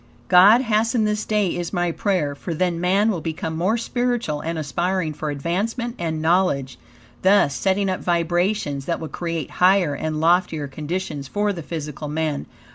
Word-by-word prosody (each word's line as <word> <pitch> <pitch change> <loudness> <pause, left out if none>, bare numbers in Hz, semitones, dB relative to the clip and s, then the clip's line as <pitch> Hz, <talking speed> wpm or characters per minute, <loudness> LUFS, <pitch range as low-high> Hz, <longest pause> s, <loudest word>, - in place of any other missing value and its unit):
God 195 +7 +7
hasten 225 -1 +1
this 210 0 -1
day 210 -4 +1
is 175 -1 -3
my 175 -2 0
prayer, 170 -6 0
for 165 +4 -5
then 175 0 0
man 195 +5 +3
will 175 -6 -3
become 160 0 -4
more 190 +8 +1
spiritual 240 -10 -1
and 165 0 -3
aspiring 165 +3 -1
for 155 +1 -4
advancement 200 - -2
and 160 -2 -2
knowledge, 160 -8 +1 0.4
thus, 190 -8 +4
setting 195 +7 +1
up 185 -1 -1
vibrations 175 -3 0
that 170 - -1
will 160 - -6
create 165 -4 -4
higher 180 -4 +4
and 155 +2 -3
loftier 165 -2 +2
conditions 150 0 -4
for 205 +7 0
the 170 - -6
physical 150 -2 -6
man. 150 -1 -2
175 Hz, 165 wpm, -22 LUFS, 155-195 Hz, 0.4 s, God